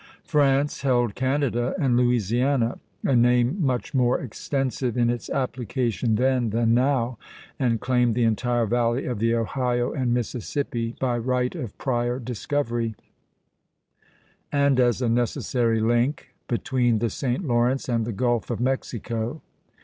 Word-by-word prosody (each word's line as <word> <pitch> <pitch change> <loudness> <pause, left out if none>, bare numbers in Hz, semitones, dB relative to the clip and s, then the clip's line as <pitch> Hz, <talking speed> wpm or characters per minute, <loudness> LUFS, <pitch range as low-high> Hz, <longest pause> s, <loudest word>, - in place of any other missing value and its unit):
France 145 -2 +2
held 120 -5 +2
Canada 130 -2 0
and 135 -8 +2
Louisiana, 120 +1 +1 0.2
a 135 - +2
name 125 +8 +3
much 130 -3 -1
more 125 -2 +2
extensive 130 0 -2
in 120 -1 +3
its 120 -1 -5
application 120 -4 -1
then 125 0 +2
than 115 +1 +2
now, 125 -2 +1 0.4
and 120 -4 +1
claimed 125 -2 +1
the 120 - +2
entire 120 +1 +1
valley 120 +3 0
of 125 -4 -3
the 115 +1 +2
Ohio 120 +1 0
and 130 -5 -1
Mississippi, 120 0 -2
by 125 -2 0
right 125 +1 0
of 125 - -6
prior 120 -2 -1
discovery, 120 -1 -2 1.6
and 140 -2 +3
as 125 0 +2
a - - +1
necessary 120 0 +1
link 120 +5 +1 0.2
between 120 -2 +1
the 115 0 -1
St. 130 - -2
Lawrence 120 +1 +1
and 115 -2 +1
the 115 - -3
Gulf 120 +2 0
of - - -2
Mexico. 120 0 -2
120 Hz, 135 wpm, -24 LUFS, 115-130 Hz, 1.6 s, name